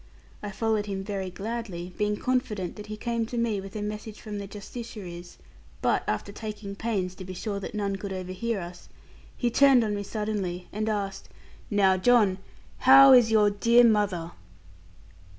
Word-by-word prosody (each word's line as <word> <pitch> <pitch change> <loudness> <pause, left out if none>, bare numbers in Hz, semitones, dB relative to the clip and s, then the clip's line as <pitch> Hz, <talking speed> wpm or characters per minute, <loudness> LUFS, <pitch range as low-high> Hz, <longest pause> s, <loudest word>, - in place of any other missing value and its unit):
I 205 - -5
followed 215 0 -1
him 195 -1 -3
very 195 -2 -4
gladly, 195 -3 -5
being 210 0 0
confident 215 -8 -1
that 210 0 -9
he 215 0 -6
came 230 0 -2
to 240 - -5
me 225 -4 0
with 195 +1 -10
a 210 - -3
message 210 +1 -6
from 210 -2 -6
the 200 - -6
Justiciaries. 200 -4 -9 0.4
But - - +1
after 105 - -2
taking 210 -2 -7
pains 200 -5 -2
to 185 - -10
be 185 0 -7
sure 200 +2 -3
that 200 - -7
none 200 -2 -1
could 195 0 -6
overhear 185 +4 -3
us, 175 +1 -10 0.5
he 240 -2 0
turned 270 -1 +6
on 210 -1 -1
me 205 - -2
suddenly, 200 -4 -3
and 215 +1 -1
asked, 200 -2 -3 0.4
'Now, 195 -3 +3
John, 205 -2 +4 0.4
how 270 +1 +9
is 245 -3 +6
your 210 -2 +4
dear 235 +4 +5
mother?' 205 -7 +2
210 Hz, 170 wpm, -27 LUFS, 190-225 Hz, 0.5 s, how